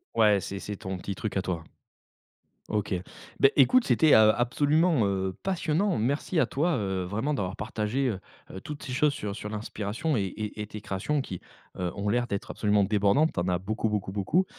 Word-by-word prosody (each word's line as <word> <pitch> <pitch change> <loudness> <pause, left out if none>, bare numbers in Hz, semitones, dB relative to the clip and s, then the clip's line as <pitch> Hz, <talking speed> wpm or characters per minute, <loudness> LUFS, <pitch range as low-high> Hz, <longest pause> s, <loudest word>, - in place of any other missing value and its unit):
Ouais, 105 -3 +5
c'est 100 +2 -5
c'est 105 - -5
ton 95 -1 -5
petit 95 +1 -5
truc 100 -1 -3
à - - +2
toi. 85 -3 -3 1.0
OK, 105 -2 -1 0.5
bah, - - +8
écoute, 240 - +5
c'était, 160 -3 +4
heu, 110 0 +7
absolument, 145 - +2
heu, 95 -1 -1
passionnant. 185 +1 0
Merci 140 - -1
à - - +3
toi, 160 +4 +1
heu, 95 -4 -1
vraiment 110 +11 -2
d'avoir 95 -7 -2
partagé, 110 +5 -1
heu 100 - -3 0.3
heu, 95 - -7
toutes 150 +7 -8
ces 130 - -6
choses 150 +2 +2
sur 105 -8 -4
sur 105 - -6
l'inspiration 110 +6 -2
et 100 - +1
et 105 +2 -5
et 105 - -4
tes 105 0 -8
créations 120 +10 -1
qui, 95 -8 -6 0.4
heu, 90 -1 -1
ont 100 0 -2
l'air 120 +2 +1
d'être 100 -3 -4
absolument 105 -1 +2
débordantes. 105 +10 +3
Tu - - -2
en 85 - -1
as 90 -1 +1
beaucoup, 110 +4 -2
beaucoup, 105 -3 -2
beaucoup. 105 - +1
105 Hz, 200 wpm, -28 LUFS, 100-140 Hz, 1.0 s, bah